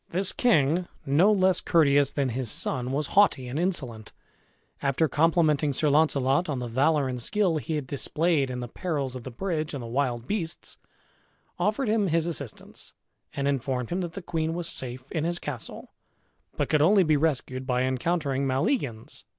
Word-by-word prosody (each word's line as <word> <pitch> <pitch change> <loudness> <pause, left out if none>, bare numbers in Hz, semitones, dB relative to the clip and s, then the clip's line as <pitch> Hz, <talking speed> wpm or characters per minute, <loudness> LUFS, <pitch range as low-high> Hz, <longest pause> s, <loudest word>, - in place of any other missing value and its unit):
This 185 +2 +4
king, 175 - +2 0.2
no 155 +9 +4
less 190 -3 +3
courteous 145 -4 +3
than 140 -2 -1
his 125 0 -3
son 125 +3 0
was 145 +2 0
haughty 195 -11 +4
and 130 +5 -3
insolent, 130 - -2 0.7
after 140 +3 +1
complimenting 155 -1 +2
Sir 150 +3 +1
Launcelot 145 +1 +2
on 145 - -1
the 125 - -4
valor 140 +4 +2
and 125 -1 -4
skill 190 - +1
he 155 +2 -3
had 150 -3 -3
displayed 145 +1 0
in 125 -1 -4
the 120 - -5
perils 140 -2 -3
of 125 - -8
the - - -5
bridge 155 +2 -3
and 130 - -5
the - - -6
wild 120 -1 -1
beasts, 170 -4 -3 0.8
offered 215 +5 0
him 215 -2 +2
his 165 -1 +1
assistance, 145 -8 -7 0.4
and 140 0 -1
informed 130 -2 -2
him 180 +2 -1
that 170 -2 -5
the 195 - -7
queen 160 -1 -2
was 175 -1 -3
safe 130 -5 -5
in 160 - -1
his 170 +1 0
castle, 140 -8 -6 0.7
but - - 0
could 155 - +2
only 190 +5 +5
be 155 -2 +3
rescued 130 -4 -1
by 125 -1 +1
encountering 135 +1 -1
Maleagans. 130 - -2
145 Hz, 175 wpm, -26 LUFS, 130-170 Hz, 0.8 s, only